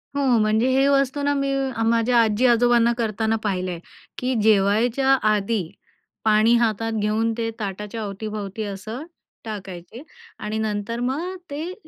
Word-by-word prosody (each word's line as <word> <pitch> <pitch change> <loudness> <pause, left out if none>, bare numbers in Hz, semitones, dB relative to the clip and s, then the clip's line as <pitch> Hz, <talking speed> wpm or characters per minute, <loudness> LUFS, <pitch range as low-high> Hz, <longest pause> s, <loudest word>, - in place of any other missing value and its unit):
हो 285 - 0 0.2
म्हणजे, 215 +3 +2
हे 270 +1 +3
वस्तू 275 0 +2
ना 285 0 +2
मी 275 -1 -1 0.4
माझ्या 235 +1 +3
आजी-आजोबांना 235 +1 +3
करताना 220 -1 0
पाहिलं 185 -3 -1
आहे 170 - -6 0.4
की 255 +1 -1
जेवायच्या 220 +6 +3 0.2
आधी 210 0 0 0.6
पाणी 215 +2 +4
हातात 225 -1 0
घेऊन 220 +2 +1
ते 225 -1 -1
ताटाच्या 210 +2 -5
अवतीभवती 210 +1 -5
असं 210 +7 -6 0.4
टाकायचे 195 - -8 0.4
आणि 215 +1 -3
नंतर 215 +2 -2
मग 305 +10 -2 0.2
ते 320 +6 -4
225 Hz, 130 wpm, -23 LUFS, 210-245 Hz, 0.6 s, पाणी